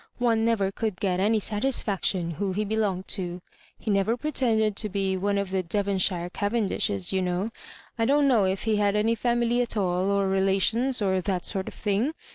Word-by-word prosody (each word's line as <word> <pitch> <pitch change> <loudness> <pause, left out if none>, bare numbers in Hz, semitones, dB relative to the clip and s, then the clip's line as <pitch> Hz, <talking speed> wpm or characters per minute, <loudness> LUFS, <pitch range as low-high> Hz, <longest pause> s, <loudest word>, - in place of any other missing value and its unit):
One 230 -3 +2
never 220 -4 +1
could 215 -2 -3
get 185 -2 0
any 215 +3 +2
satisfaction 205 -6 -1
who 190 +3 -2
he 210 +3 -1
be 215 +2 -2
longed 195 -4 -1
ta 175 -2 -2 0.4
He 215 - -3
never 200 +4 +1
pretended 230 -7 +1
to 215 - -1
be 195 -1 -1
one 200 +2 0
of 200 -2 -2
the 190 -1 +1
Devonshire 185 -1 0
Cavendishes, 205 - -1
you 190 - +1
know. 180 +4 -1 0.5
J 225 - +2
don't 285 +1 +4
know 230 -7 +4
if 190 +1 -1
he 220 -2 +1
had 205 -1 +2
any 215 +2 +2
family 240 +1 +1
at 235 -2 -2
ail, 205 - +2 0.3
or 200 -1 +1
relations, 195 +6 +2
or 190 -1 +1
that 185 -1 -2
sort 190 -1 -1
of - - -7
thing. 220 +9 0
205 Hz, 195 wpm, -26 LUFS, 190-225 Hz, 0.5 s, don't